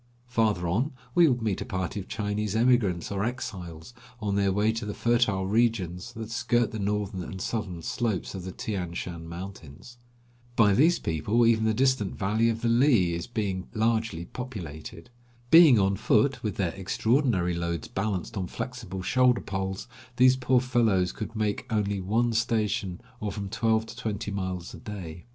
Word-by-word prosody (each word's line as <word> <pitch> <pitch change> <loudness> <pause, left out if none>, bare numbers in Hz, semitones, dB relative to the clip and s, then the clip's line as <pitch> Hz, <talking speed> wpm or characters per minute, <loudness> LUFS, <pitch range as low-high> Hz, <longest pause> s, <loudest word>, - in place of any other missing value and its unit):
Farther 110 -7 +1
on 115 - 0 0.2
we 175 -2 +6
would 125 -4 +1
meet 105 -4 -1
a - - -3
party 95 +2 -3
of 95 - -8
Chinese 105 0 -2
emigrants 110 -8 +2
or 100 0 -1
exiles, 95 -6 -5 0.3
on 105 -3 -1
their 100 -1 +2
way 105 +3 +2
to 115 +1 -4
the 105 0 -4
fertile 115 -5 +2
regions 105 -2 0
that 110 -1 -7
skirt 120 0 +1
the 110 - -5
northern 100 -1 -1
and 95 +2 -7
southern 95 -5 -3
slopes 110 -2 -2
of 95 -2 -6
the 95 - -5
Tian 90 -4 -4
Shan 85 -2 -5
mountains. 90 - -9 0.6
By 105 -4 +5
these 160 - +4
people 100 +9 +1
even 110 -1 +3
the 110 - +2
distant 130 -6 +1
valley 110 +4 +2
of 115 0 -2
the - - +2
Hi 135 - +5 0.3
is 85 - -5
being 100 -5 -3
largely 110 -6 0
populated. 85 - -8 0.4
Being 160 -7 +9
on 100 -1 +2
foot, 125 +4 +2
with 105 -4 -2
their 90 -4 -1
extraordinary 100 -1 +1
loads 85 -2 -3
balanced 100 +1 -3
on 95 -2 -2
flexible 110 -5 -6
shoulder 125 +3 +3
poles, 95 0 -4 0.3
these 130 +1 +6
poor 130 -1 +2
fellows 110 -8 +2
could 110 +1 -7
make 110 +3 -2
only 100 -2 0
one 115 +5 +1
station, 105 -5 0 0.2
or 105 -4 -3
from 100 0 -5
twelve 110 +1 +1
to - - -10
twenty 110 -3 -4
miles 95 -3 -4
a - - -8
day. 90 -5 -8
105 Hz, 175 wpm, -27 LUFS, 95-115 Hz, 0.6 s, Being